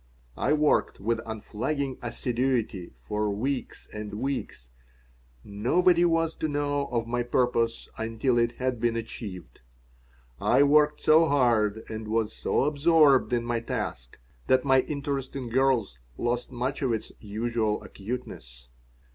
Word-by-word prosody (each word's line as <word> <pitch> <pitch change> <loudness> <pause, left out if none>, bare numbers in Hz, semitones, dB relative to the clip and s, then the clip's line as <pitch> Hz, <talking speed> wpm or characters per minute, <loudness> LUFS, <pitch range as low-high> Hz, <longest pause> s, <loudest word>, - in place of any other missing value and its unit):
I 145 - +2
worked 150 -1 +2
with 110 +3 -1
unflagging 130 +5 -3
assiduity 120 - -2
for 105 +9 -1
weeks 125 +6 -3
and 105 -1 -6
weeks. 115 - -4 0.7
Nobody 170 - +3
was 165 -1 +1
to 155 - -1
know 145 -1 -1
of 115 -2 -1
my 120 +1 -1
purpose 120 -1 0
until 115 +2 0
it 120 0 +1
had 130 -1 -2
been 120 0 +1
achieved. 100 - -7 0.8
I 140 - +4
worked 150 +1 +4
so 160 +2 +6
hard 115 -7 +2
and 110 0 -6
was 110 0 0
so - - 0
absorbed 150 -2 +4
in 120 -1 0
my 120 -1 0
task 105 - -5 0.3
that 130 +1 +3
my 135 -1 +5
interest 140 -2 -4
in 130 -3 -4
girls 120 - +1 0.2
lost 120 +1 -2
much 125 +4 -3
of 130 -4 +1
its 110 - -4
usual 110 0 -2
acuteness. 65 - -8
120 Hz, 135 wpm, -27 LUFS, 110-140 Hz, 0.8 s, so